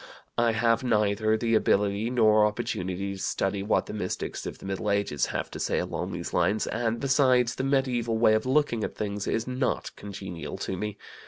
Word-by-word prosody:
I 120 -1 +3
have 115 +2 +2
neither 110 -2 +2
the 115 +1 0
ability 105 0 +2
nor 110 -3 +4
opportunity 95 -2 -3
to 95 - -8
study 95 0 -1
what 105 +3 +1
the - - -7
mystics 105 -4 -4
of - - -6
the - - -12
Middle 95 +2 -2
Ages 100 -8 +1
have - - -3
to - - -7
say - - 0
along - - -2
these - - -5
lines, 110 +2 +2
and, 115 0 -1
besides, 130 -3 +3
the 130 - -3
medieval 125 -4 +1
way 110 -1 +5
of 110 +3 +1
looking 130 -5 +2
at - - -4
things 100 -1 -3
is 115 - 0
not 130 0 -2
congenial 95 -4 -7
to 95 - -3
me. 105 +2 -4
110 Hz, 190 wpm, -27 LUFS, 100-120 Hz, -, way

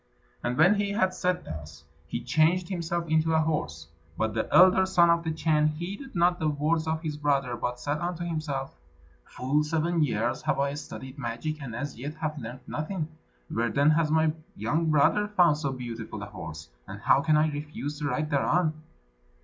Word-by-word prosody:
And 120 +1 -1
when 180 +6 +6
he 200 -1 -1
had 190 -3 +2
said 180 0 -1
thus, 75 -2 -8 0.2
he - - -4
changed 160 +7 +2
himself 170 -2 -2
into 160 0 +2
a - - +4
horse. 80 - -1 0.3
But 110 -1 0
the 110 - -2
elder 185 +1 +6
son 175 -2 +5
of 170 0 +2
the 160 - -2
Chan 155 -1 +2
heeded 185 - -5
not 175 +1 +3
the 155 - 0
words 155 +2 0
of 160 +1 -1
his 150 -2 -3
brother, 140 -4 +1
but 125 +1 -3
said 145 +4 -2
unto 175 0 -3
himself: 150 -5 -3 0.5
"Full 140 +4 0
seven 165 +2 0
years 120 -2 0
have - - 0
I 140 0 +1
studied 140 -2 -8
magic, 135 +6 -4
and 125 -5 -6
as 140 -1 -5
yet 145 +4 -5
have 155 -1 -3
learned 120 +2 -7
nothing. 155 +1 -3 0.4
Where, 115 +1 +1
then, 140 +6 +4
has 155 0 +2
my 160 0 +3 0.2
young 150 +10 0
brother 155 +8 +3
found 175 -7 +4
so 140 -3 -1
beautiful 115 -4 -6
a - - -4
horse? 80 -4 -8 0.2
and - - -8
how - - +4
can 155 0 +3
I 155 0 +3
refuse 150 0 -5
to 150 - -1
ride 150 +1 -1
thereon?" 155 +3 +2
150 Hz, 190 wpm, -27 LUFS, 130-165 Hz, 0.5 s, when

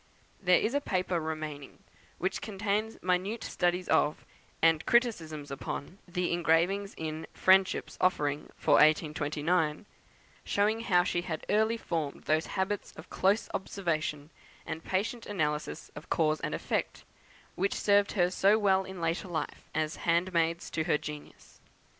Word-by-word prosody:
There 180 -2 +5
is 225 - 0
a 285 - +1
paper 185 -7 0
remaining 155 -3 -5 0.4
which 185 +2 -2
contains 210 +1 -2
minute 185 +5 0
studies 180 0 0
of, 150 - +2 0.3
and 165 -1 +4
criticisms 160 - +1
upon, 140 +6 -6
the 180 0 -1
engravings 175 +4 +1
in 160 0 -4
"Friendship's 190 0 +3
Offering 150 -6 +1
for - - +4
1829;" 155 +2 +2 0.6
showing 210 +2 +1
how 180 -6 +3
she 175 -2 0
had 165 -3 -5
early 220 +2 +3
formed 160 -9 -3
those 155 +1 +1
habits 190 +2 -2
of 160 - -13
close 200 +3 +2
observation, 155 -6 -2 0.3
and 160 - -5
patient 225 +5 -2
analysis 150 -7 -2
of 145 - -10
cause 155 -1 +2
and - - -2
effect, - - -2 0.5
which 195 +2 0
served 205 0 +3 0.2
so 200 +3 +4
well 190 -3 +3
in 190 -2 -7
after 165 +3 -1
life 160 -4 -5
as 155 0 -1
handmaids 170 -1 +1
to 160 - -1
her 160 - +3
genius. 150 0 -10
175 Hz, 135 wpm, -30 LUFS, 155-195 Hz, 0.6 s, There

